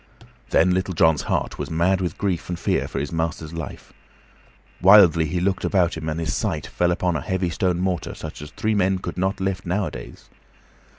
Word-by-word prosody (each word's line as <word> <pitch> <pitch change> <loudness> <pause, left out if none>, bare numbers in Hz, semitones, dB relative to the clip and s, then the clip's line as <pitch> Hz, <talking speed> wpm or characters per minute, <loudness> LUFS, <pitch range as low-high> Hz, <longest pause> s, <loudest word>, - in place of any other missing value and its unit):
Then 90 - +4
Little 95 0 -1
John's 80 -2 +4
heart - - -2
was - - -4
mad 90 +4 +1
with 90 -4 -3
grief 95 -5 -2
and 90 - -2
fear - - 0
for - - -6
his 70 +1 -2
master's 80 -1 -3
life. 80 -2 -8 0.9
Wildly 90 -4 +7
he 85 +4 -2
looked 95 +1 0
about 90 -4 +2
him, 80 -1 -4
and 80 +1 -3
his 80 -4 -2
sight - - -2
fell 90 - 0
upon 90 0 0
a 75 - -1
heavy 95 +2 -1
stone 90 +1 0
mortar, 90 -3 -2
such - - -8
as 75 - -8
three 110 +6 -1
men 95 -2 +2
could 90 - -6
not 95 +1 0
lift 95 -1 -2
nowadays. 85 -10 -4
90 Hz, 195 wpm, -23 LUFS, 80-95 Hz, 0.9 s, Wildly